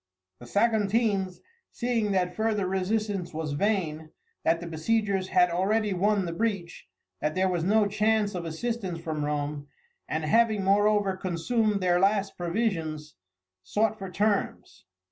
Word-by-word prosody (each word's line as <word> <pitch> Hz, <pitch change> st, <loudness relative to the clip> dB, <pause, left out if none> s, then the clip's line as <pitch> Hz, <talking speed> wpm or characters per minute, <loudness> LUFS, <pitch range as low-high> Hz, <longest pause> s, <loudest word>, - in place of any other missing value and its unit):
The 120 Hz, -, -11 dB
Saguntines, 205 Hz, -, +1 dB, 0.3 s
seeing 235 Hz, -4 st, -1 dB
that 180 Hz, -2 st, 0 dB
further 220 Hz, -3 st, 0 dB
resistance 190 Hz, -1 st, -1 dB
was 155 Hz, -2 st, -3 dB
vain, 160 Hz, -3 st, -1 dB, 0.3 s
that 165 Hz, +1 st, +2 dB
the 175 Hz, -, -7 dB
besiegers 195 Hz, +4 st, 0 dB
had 180 Hz, -2 st, +3 dB
already 205 Hz, +4 st, +1 dB
won 200 Hz, +1 st, +1 dB
the 170 Hz, -, -3 dB
breach, 195 Hz, -3 st, -3 dB, 0.3 s
that 150 Hz, 0 st, -1 dB
there 190 Hz, 0 st, +2 dB
was 175 Hz, -3 st, -1 dB
no 210 Hz, +4 st, +3 dB
chance 210 Hz, 0 st, +1 dB
of 180 Hz, -2 st, -4 dB
assistance 185 Hz, +1 st, -3 dB
from 160 Hz, -3 st, -3 dB
Rome, 145 Hz, 0 st, -3 dB, 0.4 s
and 155 Hz, 0 st, -2 dB
having, 215 Hz, +4 st, +3 dB
moreover, 205 Hz, 0 st, +3 dB
consumed 200 Hz, +4 st, 0 dB
their 175 Hz, -1 st, +3 dB
last 195 Hz, +1 st, +1 dB
provisions, 165 Hz, -5 st, -2 dB, 0.5 s
sought 215 Hz, -, 0 dB
for 195 Hz, -1 st, -6 dB
terms. 205 Hz, +1 st, -1 dB
190 Hz, 140 wpm, -27 LUFS, 170-215 Hz, 0.5 s, had